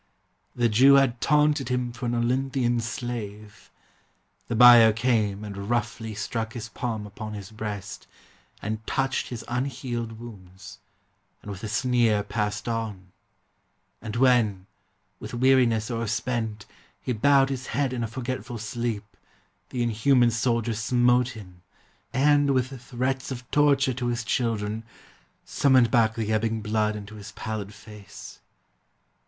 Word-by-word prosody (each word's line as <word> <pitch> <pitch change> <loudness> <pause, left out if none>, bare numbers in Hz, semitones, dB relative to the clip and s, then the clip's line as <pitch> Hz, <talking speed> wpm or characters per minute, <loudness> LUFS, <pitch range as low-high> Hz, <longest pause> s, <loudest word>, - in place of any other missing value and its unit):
The 120 -1 +2
Jew 130 +6 +6
had 130 -4 +3
taunted 150 -2 +2
him 125 -1 -1
For 120 +1 -5
an 120 - 0
Olynthian 125 0 0
slave. 110 -3 -6 0.8
The 120 - -2
buyer 120 -1 +9
came 110 -3 0
And 100 0 -6
roughly 115 -2 -2
struck 110 +1 -3
his 115 -2 -6
palm 110 -2 -4
upon 105 +1 -7
his 100 -1 -8
breast, 105 -2 -6 0.6
And 110 +1 -3
touched 135 0 -1
his 120 -3 -7
unhealed 125 -2 -3
wounds, 95 -5 -12 0.6
and 105 - -7
with 100 +1 -9
a - - -3
sneer 115 -2 +2
Passed 105 +1 -3
on; 105 -5 -4 0.9
and 105 0 -6
when, 115 -7 +3 0.5
with 110 +3 -7
weariness 125 -3 +3
o'erspent, 115 -1 -2 0.3
He 125 - -3
bowed 135 +4 +4
his 135 -1 -4
head 140 -2 -1
in 120 -2 -2
a - - -1
forgetful 125 +1 -5
sleep, 115 -1 -3 0.6
The 125 -2 -2
inhuman 120 +2 +3
soldier 115 0 0
smote 120 +2 +2
him, 90 -4 -13 0.5
and, 145 +1 +3
with 130 0 -2
threats 130 +1 -2
Of 125 -1 -7
torture 140 -3 +3
to 120 0 -3
his 120 0 -1
children, 110 -2 -1 0.6
summoned 130 -4 +3
back 115 -3 +3
The 110 -1 -1
ebbing 110 +1 0
blood 105 0 0
into 105 0 -8
his 105 +2 -10
pallid 110 -2 -5
face. 105 0 -12
115 Hz, 135 wpm, -26 LUFS, 105-125 Hz, 0.9 s, buyer